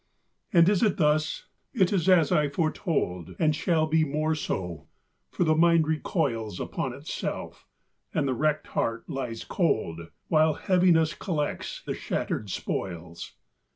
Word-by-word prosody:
And 170 -2 +6
is 200 -1 +3
it 215 -5 +2
thus? 155 -1 +1 0.3
it 190 -4 +3
is 185 -2 +1
as 170 -5 +5
I 150 -1 +3
foretold, 150 - -2
And 155 -2 +2
shall 165 0 +1
be 160 0 +2
more 155 +2 0
so; 90 - -4 0.4
for - - 0
the 155 -2 +3
mind 165 0 +4
recoils 130 - -1
Upon - - -3
itself, - - -6 0.4
and 150 -3 0
the 130 - +1
wrecked 150 +4 0
heart 115 0 -2
lies 125 -4 -4
cold, 85 - -1 0.2
While 155 -1 +4
Heaviness 175 -4 +3
collects 155 -7 -3
the - - -2
shattered 105 - -3
spoils. 85 -2 -5
155 Hz, 140 wpm, -27 LUFS, 120-165 Hz, 0.4 s, And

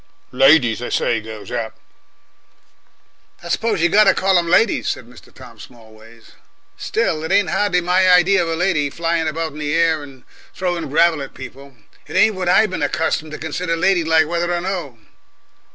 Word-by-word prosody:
"Ladies, 135 -3 +4
they 125 - -6
say, 115 -2 -1
goes 110 -1 -10
up!" 115 -2 -4 1.7
"I 170 - -8
suppose 215 -2 -1
we 175 - +4
got 210 +4 +4
to - - +4
call 190 -1 +2
'em 170 -1 -3
ladies," 205 +4 +2
said 125 - -5
Mr. 125 +1 -18
Tom - - -15
Smallways. 115 -1 -16 0.4
"Still, 155 0 -2
it 160 - -4
ain't 200 +1 +2
hardly 180 -4 +1
my 180 +2 +2
idea 180 +2 +4
of 165 - -2
a 165 - -1
lady 160 -4 0
flying 165 +1 -2
about 160 +1 -3
in 150 - -11
the 150 +1 -2
air, 165 -2 +1
and 135 -3 -13 0.3
throwing 175 -4 -3
gravel 160 +1 +2
at 135 - -9
people. 135 +1 -12 0.3
It - - -9
ain't 220 - +4
what 185 -2 -3
I 200 +4 +4
been 185 - -5
accustomed 160 -1 -2
to - - -5
consider 165 +2 -3
ladylike, 165 -3 +2
whether 170 +2 -2
or 175 0 -1
no." 175 -9 -5
165 Hz, 185 wpm, -19 LUFS, 140-180 Hz, 1.7 s, Ladies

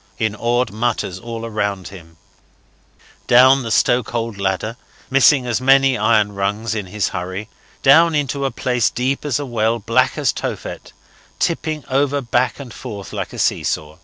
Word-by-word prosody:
in 110 -1 -1
awed 120 +1 0
mutters 110 -4 -2
all 115 0 -6
round 100 -4 -3
him; 80 -4 -14 1.1
down 130 +3 +6
the 115 - -5
stokehold 115 -2 0
ladder, 100 +4 -2 0.4
missing 135 -1 +4
many 135 0 +4
iron 105 -2 +2
rungs 105 +3 -2
in 105 -4 -4
his 105 +2 -1
hurry, 95 +4 -5 0.4
down 160 +4 +6
into 140 -1 -1
a 135 - +1
place 125 -2 0
deep 130 +4 -2
as 145 -4 0
a 145 - -4
well, 115 -2 0
black 105 - +1
as - - +1
Tophet, - - -6 0.5
tipping 155 -3 -1
over 140 +1 +1
back 125 0 0
and 130 -4 -9
forth 100 -2 -8
like - - -4
a - - -9
see - - +1
saw. 75 +1 -3
115 Hz, 160 wpm, -19 LUFS, 105-135 Hz, 1.1 s, down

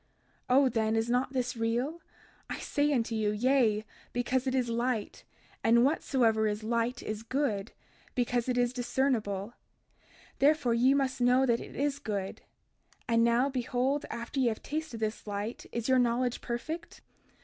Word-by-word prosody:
32:35 250 - +4
O 275 -1 +5
then, 220 -2 0
is 225 +1 0
not 250 +2 +1
this 250 -2 -1
real? 240 +8 -1 0.5
I - - -3
say 290 +1 0
unto 235 -4 0
you, 215 -2 +1
Yea, 220 -1 +2 0.3
because 250 +2 0
it 260 - +1
is 255 -2 +1
light; 235 -1 -2 0.4
and 235 +2 +5
whatsoever 235 -7 +2
is 210 +1 -2
light, 235 +2 -1
is 215 0 -4
good, 230 -5 -1 0.4
because 245 0 0
it 250 - 0
is 245 0 +2
discernible, 235 -5 -1 0.9
therefore 285 -4 +3
ye 255 +4 +4
must 265 -2 0
know 250 +2 +4
that 235 -2 +2
it - - -10
is 285 0 -1
good; 200 -7 -4 0.7
and 230 0 +3
now 235 +3 +3
behold, 260 +1 -1
after 235 +3 -4
ye 255 - +3
have 220 -2 -2
tasted 310 -6 -4
this 215 0 -3
light 205 +3 -4
is 235 -1 -3
your 260 -1 +4
knowledge 245 0 +1
perfect? 315 +8 -5
245 Hz, 160 wpm, -30 LUFS, 225-265 Hz, 0.9 s, O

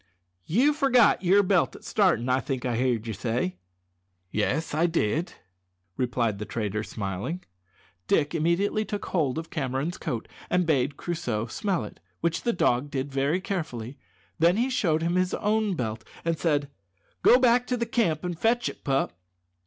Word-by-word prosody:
"You 255 - +4
forgot 260 -9 +4
your 195 +3 +5
belt 185 -3 +2
at - - -13
starting, 180 - +2
I 130 +1 +3
think 130 -2 -3
I 120 -2 0
heerd 120 -2 0
ye 110 - -3
say." 110 -3 -2 0.7
"Yes, 140 +10 0
I 160 +3 +3
did," 165 - 0 0.6
replied 120 -4 0
the 105 - -4
trader, 105 -1 -2
smiling. 105 - -4 0.6
Dick 150 0 +2
immediately 170 +6 +1
took 205 -1 -4
hold 150 -7 0
of 160 0 -5
Cameron's 140 +3 -2
coat, 115 -3 -3 0.2
and 180 0 +2
bade 140 -3 +1
Crusoe 125 -11 -2
smell 185 - -1
it, 105 - -10 0.2
which 170 -1 0
the 235 - +1
dog 140 - +1
did 140 -1 -3
very 140 +6 +1
carefully. 140 - -4 0.4
Then 170 +4 +4
he 250 +3 +1
showed 165 -10 +1
him 170 +1 +1
his 185 0 +1
own 210 -2 +1
belt 110 -5 -3 0.2
and 165 0 +1
said, 145 -4 0 0.5
"Go 245 - +7
back 250 -1 +3
to 250 - 0
the 235 - -1
camp 200 -10 0
and 175 -1 -2
fetch 240 +3 +2
it, - - -11
pup." 135 -8 0
160 Hz, 170 wpm, -27 LUFS, 125-190 Hz, 0.7 s, Go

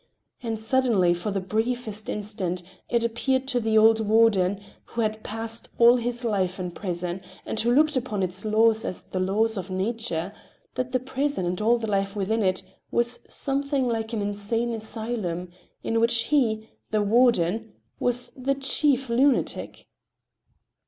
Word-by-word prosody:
And 225 -2 -3
suddenly, 220 -6 +3
for 175 +4 -3
the 200 -1 -1
briefest 220 +2 -2
instant, 200 -4 -3 0.3
it 235 -1 +1
appeared 260 +3 0
to 250 -2 +1
the 220 -1 +1
old 220 +1 +6
warden, 210 -3 +3 0.3
who 235 - -3
had 215 0 -2
passed 225 +1 -2
all 240 +1 +7
his 240 0 -1
life 190 -4 0
in 180 -1 -3
the - - -13
prison, 180 -1 -3 0.2
and 220 - -2
who 235 +2 +2
looked 300 +4 +4
upon 225 -6 -1
its 185 +1 -2
laws 220 +1 +3
as 185 - -4
the 185 - -5
laws 210 +4 +1
of 190 0 -5
nature, 195 -2 -2 0.4
that 255 0 -3
the 255 - +1
prison 265 -3 -1
and 180 +3 -2
all 235 +3 +4
the 230 - -4
life 195 -1 -1
within 215 +3 0
it 185 -2 +1 0.3
was 240 +1 +1
something 275 -1 0
like 225 -1 -2
an 220 -3 -2
insane 205 +4 -1
asylum, 220 -5 -3 0.3
in 225 - 0
which 230 0 +3
he, 220 -7 +1 0.2
the 215 -1 +1
warden, 225 -2 +2 0.3
was 245 0 +1
the 275 +1 -1
chief 275 -1 +1
lunatic. 255 +3 0
225 Hz, 160 wpm, -25 LUFS, 200-240 Hz, 0.4 s, all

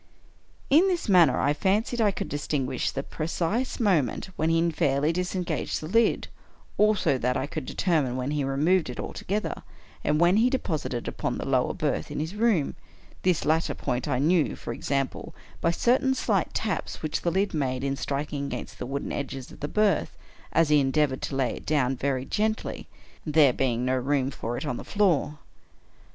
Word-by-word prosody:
In 325 +7 +6
this 360 -3 -1
manner 175 -9 +5
I 145 - +2
fancied 210 +9 0
I 210 - +4
could 195 - -3
distinguish 145 -2 -1
the 135 - -4
precise 175 - -2
moment 185 - +1
when 160 +1 0
he 165 +1 +2
fairly 150 0 +1
disengaged 180 0 -2
the 155 - -6
lid 230 +6 +2 0.3
— - - -30
also, 205 -10 +3
that 125 +1 0
I 130 - -1
could 140 - -6
determine 150 -9 0
when 130 +2 -2
he 150 -1 0
removed 150 +5 +2
it 125 - -6
altogether, 210 +3 -3 0.4
and 150 0 +1
when 175 +4 +5
he 235 +3 +4
deposited 155 - -2
it - - -9
upon - - -2
the - - -4
lower - - +1
berth - - -1
in - - -4
his 160 +4 -3
room; 210 -9 +1 0.5
this 180 -3 +1
latter 160 +2 +1
point 125 +3 -2
I 135 -4 +1
knew, 155 +4 +2
for 115 - -6
example, 135 +2 -3 0.3
by 170 - +3
certain 255 +9 +2
slight 200 -8 0
taps 215 -6 -2
which 155 -1 -1
the 175 - +1
lid 195 +4 0
made 130 -4 -1
in 140 0 0
striking 140 +1 -3
against - - -6
the 125 - -4
wooden 140 +2 -3
edges 135 -2 -5
of - - -13
the 145 - -3
berth, 205 -2 +1 0.3
as 165 -2 +3
he 150 -1 +5
endeavored 135 0 +1
to 140 - -3
lay 130 -3 0
it - - -12
down 135 -4 +2
very 130 0 -1
gently 215 +7 -2 0.2
— - - -27
there 150 -4 +4
being 125 -2 0
no 130 0 +1
room 135 +1 0
for 120 -2 -4
it - - -4
on 120 - -2
the - - -7
floor. 170 -7 +1
150 Hz, 190 wpm, -26 LUFS, 135-185 Hz, 0.5 s, In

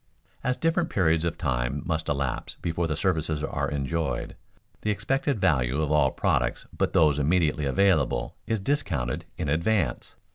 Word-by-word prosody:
_As 125 0 0
different 165 +1 +1
periods 85 -3 +2
of 85 0 -2
time 65 -3 -1
must 80 -2 -2
elapse 70 -3 -2
before 85 0 -1
services 80 -3 0
are - - -1
enjoyed, 75 -1 -2 0.5
the 110 - -1
expected 135 +4 0
value 70 -5 +2
of 75 -1 0
all 75 -3 +4
products - - 0
but - - 0
those 75 -3 +4
immediately 75 0 +2
available 80 -5 +2
is 110 -1 0
discounted 90 - -1
in - - -2
advance. 85 - 0
80 Hz, 145 wpm, -26 LUFS, 70-95 Hz, 0.5 s, all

